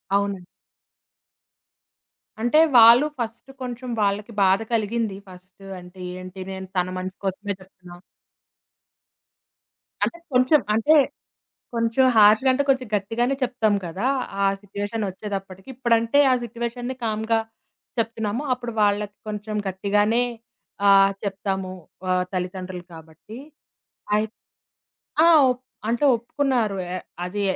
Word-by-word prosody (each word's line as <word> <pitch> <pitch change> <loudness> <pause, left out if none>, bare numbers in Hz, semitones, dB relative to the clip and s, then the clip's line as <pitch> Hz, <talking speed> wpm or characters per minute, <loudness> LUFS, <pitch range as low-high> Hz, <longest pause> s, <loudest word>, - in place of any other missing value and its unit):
అవునండి. 200 -3 -1 2.0
అంటే, 240 +7 +4 0.2
వాళ్ళు 235 +5 +8
ఫస్టు 235 +3 -5
కొంచెం 250 0 -5
వాళ్ళకి 205 +3 0
బాధ 190 +1 +4
కలిగింది 220 -1 0
ఫస్టు 185 +2 -15
అంటే 180 +1 -14 0.2
ఏంటి 185 +1 -9
నేను 190 0 -6
తన 180 0 +1
మంచి 185 +1 -5
కోసమే 200 +1 -2
చెప్తున్నా 180 -2 -14 2.1
అంటే 340 - -1 0.2
కొంచెం. 255 +4 +5
అంటే 260 +9 +4 0.8
కొంచెం 230 +3 +2
హార్ష్‌గా 215 +5 +6
అంటే, 280 +2 +1
కొంచెం 260 -2 +2
గట్టిగానే 225 +6 0
చెప్తాం 240 -4 +1
కదా! 185 +8 -3 0.4
ఆ - - +4 0.2
సిట్యుయేషనొచ్చేటప్పటికి 200 -1 -5
ఇప్పుడంటే, 235 +1 +2
ఆ - - +5
సిట్యుయేషన్‌ని 240 +2 -4
కామ్‌గా 220 +1 0 0.6
చెప్తున్నాము. 225 +2 -1
అప్పుడు 245 -1 -3
వాళ్ళకి 205 0 +1
కొంచెం 210 0 -4
గట్టిగానే, 205 +5 +1 0.6
ఆహ్, 195 0 +6
చెప్తాము 195 -1 -3 0.4
ఆహ్, 180 0 +2
తల్లిదండ్రులు 185 0 -4
కాబట్టి. 160 +7 -12 0.8
అయిత్ 215 +1 -1 0.9
ఆ! - - +7 0.2
ఒప్ 250 0 -3 0.3
అంటే 235 +5 +1
ఒప్పుకున్నారు. 235 -3 0 0.2
ఎ - - -1 0.3
అది 200 +3 -3
210 Hz, 105 wpm, -23 LUFS, 190-235 Hz, 2.1 s, వాళ్ళు